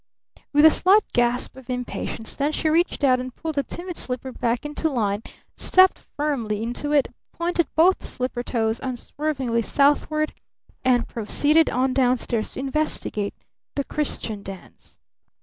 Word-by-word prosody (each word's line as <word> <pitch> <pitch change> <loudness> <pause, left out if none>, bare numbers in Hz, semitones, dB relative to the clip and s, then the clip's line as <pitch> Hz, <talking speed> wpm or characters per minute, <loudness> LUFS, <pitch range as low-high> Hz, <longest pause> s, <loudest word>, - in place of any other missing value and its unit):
With 295 +1 +5
a 315 - +9
slight 395 +6 +5
gasp 245 +1 +1
of 265 -1 -14
impatience, 250 -2 -4
then, 290 +2 0
she 310 - 0
reached 330 -1 +1
out 255 -2 +4
and 255 0 -6
pulled 320 -1 -4
the 285 - +1
timid 345 +6 -7
slipper 255 +1 -2
back 240 +2 -1
into 295 +2 -1
line, 210 -6 0 0.3
stepped 375 0 +4
firmly 235 -8 -2
into 245 +5 -3
it, 290 -2 +3 0.2
pointed 340 -2 0
both 350 +4 +4
slipper 250 -1 -3
toes 225 -2 -1
unswervingly 260 -1 -2
southward, 295 +4 +2 0.5
and 245 -2 +3
proceeded 295 +8 +2
on 255 +1 +1
down 255 -1 +3
stairs 230 -2 -2
to - - -6
investigate 270 -7 -1 0.4
the 280 - 0
"Christian 235 -8 -3
Dance." 195 -2 -12
265 Hz, 150 wpm, -23 LUFS, 240-305 Hz, 0.5 s, a